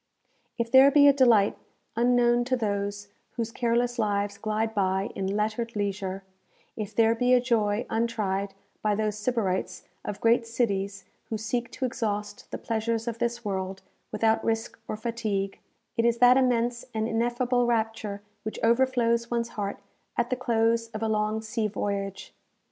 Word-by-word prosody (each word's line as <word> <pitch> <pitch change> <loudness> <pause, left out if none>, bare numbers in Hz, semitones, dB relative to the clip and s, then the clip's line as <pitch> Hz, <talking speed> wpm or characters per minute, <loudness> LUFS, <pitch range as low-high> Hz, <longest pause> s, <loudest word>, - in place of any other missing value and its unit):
If 235 -1 -2
there 265 +1 +8
be 285 0 +6
a 280 - +7
delight 235 -7 +4 0.4
unknown 240 0 +3
to 255 0 +1
those 205 -2 -2 0.2
whose 230 -1 -3
careless 240 +1 0
lives 205 -2 0
glide 220 +1 -1
by 190 -1 0
in 190 - -3
lettered 220 +2 -2
leisure; 195 -2 -2 0.5
if 210 -3 -5
there 225 0 +4
be 250 +2 +3
a - - +5
joy 225 -3 +1
untried 200 -4 -1 0.3
by 210 -1 +1
those 215 -1 -1
Sybarites 210 -4 -1 0.2
of 205 0 -5
great 230 +1 +3
cities 200 -4 -1 0.2
who 220 - -2
seek 235 +2 -2
to 260 - -2
exhaust 210 -4 -3
the - - -4
pleasures 225 0 -2
of 230 -1 -3
this 235 -1 -2
world 190 -1 -3 0.3
without 220 +1 +2
risk 225 0 -2
or 215 - -3
fatigue, 215 -4 -2 0.4
it 230 - +1
is 235 0 +3
that 245 +1 +7
immense 245 -2 +1
and 220 0 0
ineffable 240 +2 +1
rapture 220 -3 -1 0.2
which 215 - -5
overflows 235 -1 +2
one's 235 -1 -1
heart 205 -1 -5 0.3
at 240 +1 0
the - - +2
close 230 -2 +1
of 215 - -3
a - - +1
long 215 0 0
sea 220 0 -1
voyage. 200 -1 -4
225 Hz, 160 wpm, -27 LUFS, 205-235 Hz, 0.5 s, there